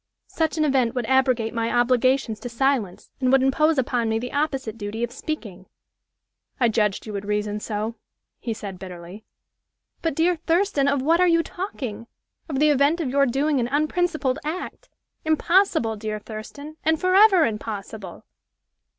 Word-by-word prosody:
Such 320 0 -2
an 310 - +2
event 260 -4 +1
would 245 -2 -1
abrogate 255 -3 +2
my 230 -1 -1
obligations 245 -1 +2
to 245 - -6
silence, 235 -6 -1
and 255 -1 +2
would 270 -1 +5
impose 305 +4 +3
upon 245 -3 0
me 220 - +1
the 250 +2 -5
opposite 270 -6 -1
duty 220 +1 -5
of 240 - -2
speaking." 220 - -6 0.9
"I 240 -3 +4
judged 210 -3 0
you 215 - -7
would 200 0 -4
reason 210 0 -1
so," 215 +1 -3 0.5
he 235 - -4
said, 200 -4 -6
bitterly. 180 +2 -10 0.8
"But, 325 -4 -1
dear 340 +2 +2
Thurston, 330 -3 +1
of 280 -2 +1
what 330 +4 +3
are 365 - +5
you 335 -1 +3
talking? 250 - -6 0.4
Of 280 - -2
the 300 +2 +4
event 290 +4 +3
of 285 -7 -2
your 280 0 +3
doing 275 +3 +1
an 235 - 0
unprincipled 305 0 0
act! 320 +5 -5 0.3
Impossible, 315 - +2
dear 215 0 -4
Thurston! 260 +9 -9
and 320 0 +2
forever 375 -1 +5
impossible!" 210 -2 -6
260 Hz, 160 wpm, -23 LUFS, 220-310 Hz, 0.9 s, would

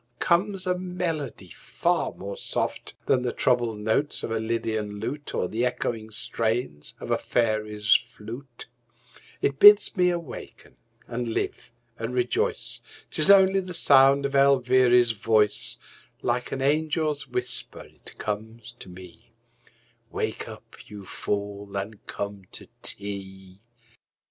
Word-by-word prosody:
comes 185 +2 +1
a 180 0 +1
melody 175 - -4
far - - -1
more 100 +1 -7
soft - - -3
Than 130 -2 +2
the 125 -1 -1
troubled 120 -3 +1
notes 110 +8 -1
of - - -4
a 115 - 0
lydian 110 -2 -2
lute 145 +7 -5
Or 90 - 0
the 115 +6 -2
echoing 115 -3 -2
strains 110 -6 -2
of - - -6
a - - +2
fairy's 105 -3 +1
flute; 120 +3 -4 0.8
It 140 0 0
bids 205 0 +8
me 180 -2 +3
awaken 170 - -7 0.3
and 120 0 -4
live 115 - -3 0.3
and 115 +2 -4
rejoice, 125 -1 0 0.3
'Tis 155 - +4
only 195 -1 +6
the 180 -2 -6
sound 140 -1 +5
of 140 - -2
Elviry's 130 -3 +4
voice 110 -1 +1 0.5
Like 125 +1 -1
an 135 - -3
angel's 155 0 0
whisper 125 0 +1
it - - -14
comes 110 +2 -5
to - - -10
me: 90 -1 -14 0.8
"Wake - - -3
up, - - -13
you 105 -2 -10
fool, 100 0 -4
and 100 +2 -6
come 100 -1 -5
to - - -8
tea." 95 -1 -4
120 Hz, 130 wpm, -26 LUFS, 105-140 Hz, 0.8 s, bids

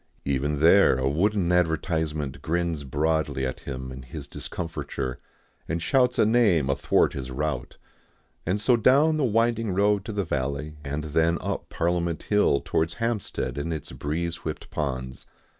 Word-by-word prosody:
Even 70 +2 0
there 85 -3 +6
a 65 0 0
wooden 90 +5 +1
advertisement 80 -5 0
grins 85 -2 -1
broadly 75 0 0
at 65 - -4
him 65 -1 -6
in 65 0 -8
his 60 - -8
discomfiture, 70 -6 -5 0.5
and 85 +1 -1
shouts 125 +7 +2
a - - +5
name 105 - +3
athwart 70 - +2
his 65 -2 -5
route. 70 -1 -3 0.7
And 95 +4 0
so 120 +4 +4
down 140 +7 +4
the 150 - +1
winding 115 -3 +1
road 100 0 +3
to 110 - -4
the 100 -2 -1
valley, 70 +1 -3
and 75 +2 -3
then 80 +2 +2
up - - -4
Parliament 85 -1 -1
Hill 105 -9 +2
towards 80 +1 0
Hampstead 115 -10 -2
and 85 +3 -3
its 80 -3 -4
breeze 85 +3 -3
whipped 80 -2 -6
ponds. 65 -3 -4
80 Hz, 155 wpm, -26 LUFS, 70-100 Hz, 0.7 s, there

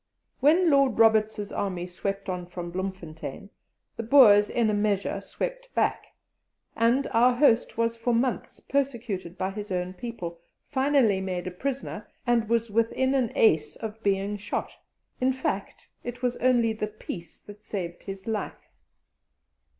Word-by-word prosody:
When 325 +5 +4
Lord 275 -4 +4
Roberts's 220 -2 +3
army 180 -3 -2
swept 195 +2 -4
on 180 -2 -4
from 175 -1 -6
Bloemfontein, 185 -1 -6 0.5
the - - -2
Boers 215 -4 +7
in 230 -3 +1
a - - -1
measure 205 -1 0
swept - - -5
back, - - +1 0.7
and 240 +4 +3
our 245 +2 +5
host 245 -5 +3
was 230 0 0
for 230 +1 0
months 240 +1 -1
persecuted 235 -10 -2
by 190 +1 -1
his 205 0 -7
own 180 0 -2
people, 180 -5 -6 0.3
finally 265 -8 +2
made 185 -2 -3
a 185 - -3
prisoner, 255 0 -4 0.2
and 235 -3 +2
was 230 -1 +1
within 230 +4 +1
an 255 -4 +1
ace 155 -9 +3
of 220 0 -7
being 200 0 0
shot; 205 0 -3 0.5
in 255 +1 +3
fact, 200 -6 -4 0.2
it 245 +1 -7
was 245 -1 +1
only 240 -3 +3
the 215 -1 -3
peace 180 -5 -8
that 205 0 -13
saved 175 -4 -5
his 195 -1 -7
life. 220 -2 -4
215 Hz, 150 wpm, -27 LUFS, 190-245 Hz, 0.7 s, Boers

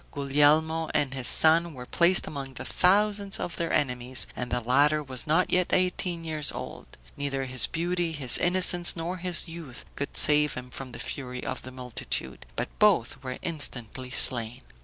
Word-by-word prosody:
Guglielmo 150 +3 +1
and 145 -3 0
his 130 -2 -1
son 165 0 +3
were 125 -1 -10
placed 175 +7 +2
among 135 -3 -8
the - - -8
thousands 200 +1 +1
of 175 - -6
their 170 -1 -3
enemies, 125 -2 0
and 125 0 -5
the 125 - -2
latter 145 +6 +1
was 130 +1 -7
not 160 +4 +1
yet 180 -1 0
eighteen 180 -2 -1
years 155 -3 -1
old; - - -10 0.2
neither 135 -1 -4
his 130 -2 +1
beauty, 175 0 -3
his 140 -6 +7
innocence, 175 -1 +4
nor 170 +2 -5
his 180 -1 0
youth, 165 -7 -11
could 140 - -6
save 150 -1 +4
him 125 0 -9
from 130 0 -9
the - - -9
fury 125 -1 -7
of 130 - -5
the 130 - -11
multitude; 125 - -6
but - - -4
both 135 - +1
were 130 -2 -7
instantly 130 -6 +1
slain. 120 - 0
145 Hz, 175 wpm, -26 LUFS, 130-170 Hz, 0.2 s, his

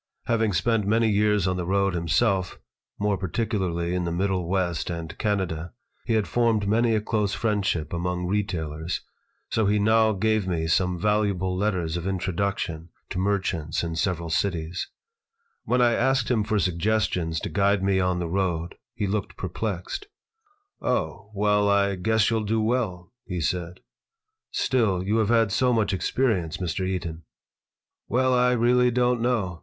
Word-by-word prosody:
Having 110 -3 +1
spent 105 +4 +1
many 115 +2 +3
years 105 -2 +2
on 90 0 0
the 90 - -2
road 100 0 +2
himself, 95 +3 +1 0.4
more 100 -1 0
particularly 95 -4 -1
in 90 0 0
the 85 - -2
Middle 90 -1 -1
West 90 -4 0
and 85 -1 -5
Canada, 95 -5 -1 0.3
he 115 - +1
had 110 -2 +1
formed 115 -4 +1
many 115 +2 +3
a 105 - +1
close 105 -2 0
friendship 100 -8 -1
among 90 +1 -2
retailers, 85 -4 -2 0.5
so 110 -2 +2
he 105 +1 +3
now 110 +1 +4
gave 110 0 +1
me 85 -3 -1
some 90 +2 +1
valuable 100 -2 +1
letters 90 -4 -1
of 85 +2 -4
intro 95 -1 -2
duction 85 -3 -2 0.2
to 90 - -2
merchants 95 -6 -1
in 85 -1 -3
several 85 -1 -1
cities 85 0 -1 0.8
When 125 0 +3
I 120 -1 +4
asked 130 0 +1
him 110 -4 +2
for 105 0 0
suggestions 90 -3 0
to - - -3
guide 100 -1 +2
me 95 -1 +2
on 90 -1 +1
the 90 -1 -2
road 85 -2 -1 0.2
he 105 - -1
looked 100 0 -3
perplexed 95 - -4 0.7
"Oh, 105 -2 -2
well, 105 0 +2
I 100 0 +3
guess 110 +3 +2
you'll 110 -1 +1
do 110 +2 0
well," 110 -4 -1
he 90 -2 -3
said 90 +2 -2 0.7
"Still, 105 -8 +1
you 105 +4 +1
have 110 -2 +2
had 115 -3 +3
so 125 +5 +2
much 110 -4 +1
experience, 95 -3 0
Mr. 95 0 -2
Eaton." 85 -3 -3 0.9
"Well, 130 +1 +2
I 125 0 +4
really 125 +1 +4
don't 125 0 +1
know. 105 -9 0
100 Hz, 160 wpm, -25 LUFS, 90-110 Hz, 0.9 s, now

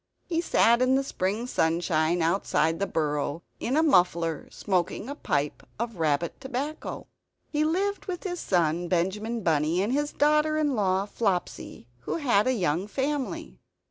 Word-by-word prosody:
He 335 -2 0
sat 235 -7 +4
in 255 +1 +4
the 270 - +2
spring 210 -2 -2
sunshine 165 -4 +1
outside 165 -2 +1
the 200 - 0
burrow, 150 -1 -1 0.2
in 260 +5 0
a 315 - +4
muffler; 175 - +2
smoking 185 +2 -1
a 285 - -4
pipe 145 - -2 0.2
of 230 -2 -4
rabbit 160 +1 0
tobacco. 275 +4 -4 0.5
He 300 0 +1
lived 390 +6 -1
with 360 -2 -4
his 355 -3 -3
son 175 -1 +1
Benjamin 210 +6 -1
Bunny 160 +1 +2
and 220 +5 -1
his 295 +1 0
daughter 300 +1 +2
in 300 -2 +1
law 195 -2 +1
Flopsy, 195 - -3
who - - -4
had 250 -9 +2
a 260 - +3
young 180 -3 0
family. 275 +3 -3
205 Hz, 155 wpm, -27 LUFS, 170-280 Hz, 0.5 s, sat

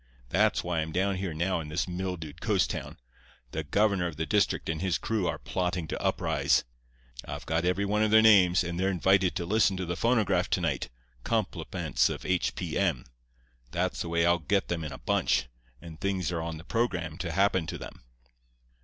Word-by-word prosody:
That's - - +2
why 85 -1 -1
I'm 80 0 -2
down 95 +3 0
here 95 -2 -3
now 85 +4 0
in 80 - -6
this 80 +4 -2
mildewed 90 -4 -5
coast - - +1
town. - - -6 0.5
The 80 - -3
governor 100 +4 +2
of 85 - -6
the 80 - -1
district 105 +2 +1
and 80 -1 -2
his 95 -3 +1
crew 110 -5 -1
are - - -1
plotting 90 -2 -2
to - - -4
uprise. - - +1 0.6
I've - - -7
got 80 +1 0
every 90 +3 +1
one 105 +1 +1
of 110 - +3
their 110 +1 +6
names, 95 -5 +6
and 85 0 -4
they're 95 +1 +2
invited 95 0 +3
to 90 -2 -2
listen 100 0 +2
to 95 - -3
the 85 +1 -3
phonograph 100 -5 +2
to 90 - +1
night, 80 -6 -1 0.3
compliments - - 0
of - - -5
H. 95 -1 0
P. - - -3
M. - - 0 0.6
That's 90 +7 -1
the 85 - -4
way 85 0 +2
I'll 85 0 +3
get 100 +6 0
them 85 -2 -2
in 75 - -5
a 65 - -7
bunch, - - +1 0.3
and 80 +2 -11
things 95 -3 -1
are 85 -2 -2
on 80 -1 -4
the 80 - -10
programme 90 -8 -2
to 85 -3 -3
happen 95 -1 +2
to - - -4
them. - - -10
90 Hz, 205 wpm, -28 LUFS, 80-95 Hz, 0.6 s, their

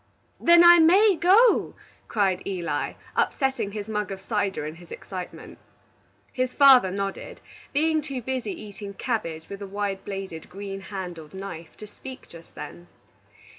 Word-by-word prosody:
"Then 340 0 +7
I 345 0 +9
may 380 +5 +6
go?" 395 +9 +4 0.3
cried 195 -4 +1
Eli, 170 -6 -2 0.2
upsetting 265 -7 0
his 210 -1 -5
mug 210 -2 -2
of 195 - -5
cider 195 -5 -2
in 155 +2 -6
his 175 -1 -15
excitement. 185 -2 -8 0.7
His 255 0 -1
father 265 -8 +7
nodded, 195 +1 -5 0.3
being 315 +2 +2
too 275 -4 -6
busy 260 - -3
eating 200 -1 -9
cabbage 165 -11 -3
with 200 0 -8
a 200 - -5
wide 200 0 -3
bladed 195 -5 -7
green 195 +1 -7
handled 180 -5 -7
knife 180 -4 -8
to 215 - -9
speak 260 +5 -11
just 165 -1 -15
then. 85 +1 -9
200 Hz, 145 wpm, -25 LUFS, 190-265 Hz, 0.7 s, I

